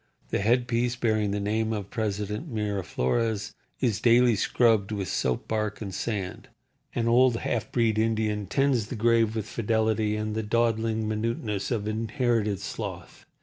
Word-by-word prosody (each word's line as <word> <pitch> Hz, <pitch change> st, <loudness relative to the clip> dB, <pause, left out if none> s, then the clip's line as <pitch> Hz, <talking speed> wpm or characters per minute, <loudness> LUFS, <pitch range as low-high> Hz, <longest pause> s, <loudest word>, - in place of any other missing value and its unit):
The -, -, 0 dB
headpiece 120 Hz, +2 st, +1 dB
bearing 110 Hz, -4 st, +1 dB
the 100 Hz, +1 st, -1 dB
name 110 Hz, +2 st, 0 dB
of 105 Hz, -3 st, -4 dB
President 105 Hz, -, -3 dB
Miraflores 105 Hz, -, -1 dB, 0.3 s
is 115 Hz, -7 st, +1 dB
daily 120 Hz, 0 st, +5 dB
scrubbed 110 Hz, -1 st, +2 dB
with 100 Hz, -3 st, -2 dB
soap 65 Hz, -5 st, -1 dB
bark 110 Hz, -2 st, -2 dB
and 100 Hz, -3 st, -6 dB
sand. 100 Hz, -5 st, -4 dB, 0.5 s
An 115 Hz, -1 st, 0 dB
old 125 Hz, +1 st, +5 dB
half 115 Hz, -1 st, -2 dB
breed 115 Hz, -3 st, +2 dB
Indian 110 Hz, -2 st, 0 dB
tends 130 Hz, -2 st, +1 dB
the 125 Hz, -, -5 dB
grave 115 Hz, 0 st, +3 dB
with 110 Hz, -2 st, -2 dB
fidelity 110 Hz, -1 st, 0 dB
and 110 Hz, 0 st, -2 dB
the 110 Hz, -, -1 dB
dawdling 110 Hz, 0 st, 0 dB
minuteness 110 Hz, -2 st, -2 dB
of 110 Hz, -4 st, -1 dB
inherited 110 Hz, -2 st, 0 dB
sloth. 100 Hz, -, -7 dB
110 Hz, 145 wpm, -27 LUFS, 105-115 Hz, 0.5 s, daily